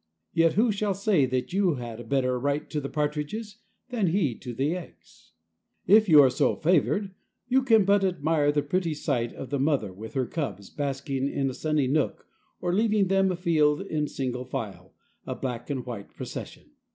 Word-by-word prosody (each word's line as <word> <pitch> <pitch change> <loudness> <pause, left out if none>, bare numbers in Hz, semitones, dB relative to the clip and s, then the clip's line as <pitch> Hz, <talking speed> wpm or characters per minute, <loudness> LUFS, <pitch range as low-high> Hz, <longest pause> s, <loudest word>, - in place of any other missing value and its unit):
Yet 165 -1 +4
who 225 +3 +3
shall 205 -1 -1
say 195 -8 +2
that 130 +5 -2
you 190 -5 +2
had 120 -3 -7
a - - -7
better 130 +1 0
right 140 +3 -1
to 150 - -1
the 140 - -5
partridges 155 +9 -3 0.3
than 230 -7 0
he 165 -7 +1
to 125 - -6
the 140 +8 -1
eggs? 180 - -12 0.5
If 210 +2 +6
you 150 -3 +9
are 130 - +5
so 125 - +1
favored, 185 +4 +1 0.3
you 260 +2 +3
can 225 -6 +4
but 200 0 +4
admire 160 -5 +2
the 145 -1 0
pretty 165 +1 -1
sight 120 -6 -1
of 135 - -9
the 140 - 0
mother 135 -9 0
with 110 +6 -10
her 130 -2 +1
cubs 105 - -5
basking 140 -1 -2
in 135 -1 -1
a - - -8
sunny 155 0 0
nook 145 +3 0 0.3
or 175 0 -1
leading 210 -1 +2
them 195 0 +3
afield 165 -3 +2
in 155 -6 -2
single 125 -3 -3
file, 110 -5 -6 0.3
a - - -3
black 120 -1 -5
and 130 -4 -3
white 115 -5 -8
procession. - - -8
150 Hz, 190 wpm, -27 LUFS, 130-190 Hz, 0.5 s, you